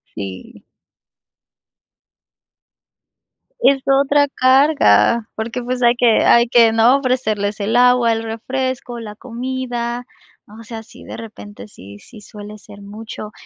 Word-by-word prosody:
Sí. 95 Hz, -2 st, -9 dB, 3.0 s
Es 270 Hz, 0 st, +3 dB
otra 280 Hz, +1 st, +3 dB
carga, 260 Hz, -3 st, +3 dB
porque, 235 Hz, +3 st, -5 dB
pues, 250 Hz, +1 st, -4 dB
hay 240 Hz, +1 st, +4 dB
que 240 Hz, -2 st, +2 dB
hay 235 Hz, 0 st, +4 dB
que, 230 Hz, -2 st, +4 dB
¿no?, 230 Hz, +4 st, +4 dB
ofrecerles 220 Hz, -6 st, -2 dB
el 215 Hz, +4 st, -2 dB
agua, 245 Hz, -1 st, +4 dB
el 225 Hz, 0 st, -4 dB
refresco, 245 Hz, +2 st, -4 dB
la 210 Hz, -2 st, -9 dB
comida, 245 Hz, 0 st, -5 dB, 0.5 s
o -, -, -11 dB
sea, 225 Hz, 0 st, -9 dB
sí -, -, -16 dB
de -, -, -9 dB
repente 215 Hz, -2 st, -11 dB
sí 100 Hz, -, -14 dB
sí 225 Hz, -, -16 dB
suele 210 Hz, 0 st, -11 dB
ser 205 Hz, 0 st, -15 dB
mucho, 215 Hz, +1 st, -9 dB
235 Hz, 125 wpm, -18 LUFS, 215-255 Hz, 3.0 s, hay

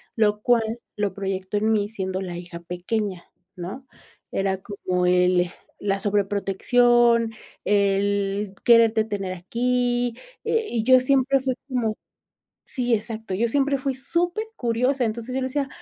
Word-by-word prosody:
lo 210 Hz, -2 st, +2 dB
cual, 230 Hz, 0 st, +1 dB, 0.2 s
lo 205 Hz, -2 st, 0 dB
proyectó 195 Hz, 0 st, -3 dB
en 215 Hz, +2 st, +2 dB
mí 205 Hz, -1 st, +1 dB
siendo 190 Hz, -3 st, -3 dB
la 175 Hz, -2 st, -5 dB
hija 175 Hz, -1 st, -8 dB
pequeña, 180 Hz, +2 st, -3 dB, 0.3 s
¿no? 190 Hz, +10 st, -7 dB, 0.5 s
Era 195 Hz, 0 st, 0 dB
como 185 Hz, -3 st, -2 dB
el 180 Hz, -1 st, +3 dB, 0.3 s
la 195 Hz, -1 st, 0 dB
sobreprotección, 225 Hz, +4 st, +3 dB, 0.3 s
el 200 Hz, 0 st, +1 dB
quererte 230 Hz, -2 st, +5 dB
tener 200 Hz, -4 st, -3 dB
aquí. 245 Hz, +5 st, 0 dB, 0.3 s
Eh, 450 Hz, -1 st, +1 dB
y 230 Hz, -2 st, -1 dB
yo 255 Hz, +1 st, +7 dB
siempre 270 Hz, 0 st, +3 dB
fui 260 Hz, -1 st, -1 dB
como 235 Hz, -5 st, -1 dB, 0.7 s
sí, 245 Hz, -3 st, -1 dB
exacto. 220 Hz, -2 st, -2 dB
Yo 230 Hz, +4 st, +1 dB
siempre 280 Hz, +1 st, +2 dB
fui 265 Hz, 0 st, -2 dB
supercuriosa, 280 Hz, -, -1 dB
entonces 235 Hz, +2 st, -3 dB
yo 265 Hz, -, 0 dB
le 260 Hz, -, 0 dB
decía: 275 Hz, +1 st, -1 dB
220 Hz, 135 wpm, -24 LUFS, 195-245 Hz, 0.7 s, yo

